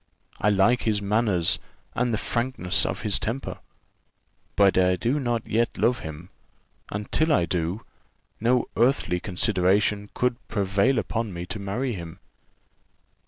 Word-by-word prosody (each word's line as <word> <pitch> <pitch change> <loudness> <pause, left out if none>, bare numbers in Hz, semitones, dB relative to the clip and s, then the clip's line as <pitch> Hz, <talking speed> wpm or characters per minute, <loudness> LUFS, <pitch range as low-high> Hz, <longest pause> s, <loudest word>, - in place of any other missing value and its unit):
I 105 - +3
like 105 +5 +3
his 110 -2 +1
manners 100 -4 +2 0.3
and 125 0 0
the 110 - +1
frankness 110 -6 0
of 95 - -4
his 105 -2 +2
temper; 125 +5 -4 1.0
but 100 -2 +4
I 90 0 +4
do 120 +11 0
not 120 -4 -1
yet 115 +1 0
love 125 +1 +2
him, 80 +3 -8 0.6
and 100 +1 -5
till 155 +1 +3
I 115 - +3
do, 85 +5 -2 0.5
no 120 +2 +2
earthly 120 -7 +2
consideration 100 +1 +1
could 125 -1 +1
prevail 100 +5 +1
upon 115 -2 -2
me 85 0 -5
to 105 +4 -5
marry 115 +6 -2
him." 85 -3 -7
105 Hz, 140 wpm, -25 LUFS, 95-120 Hz, 1.0 s, but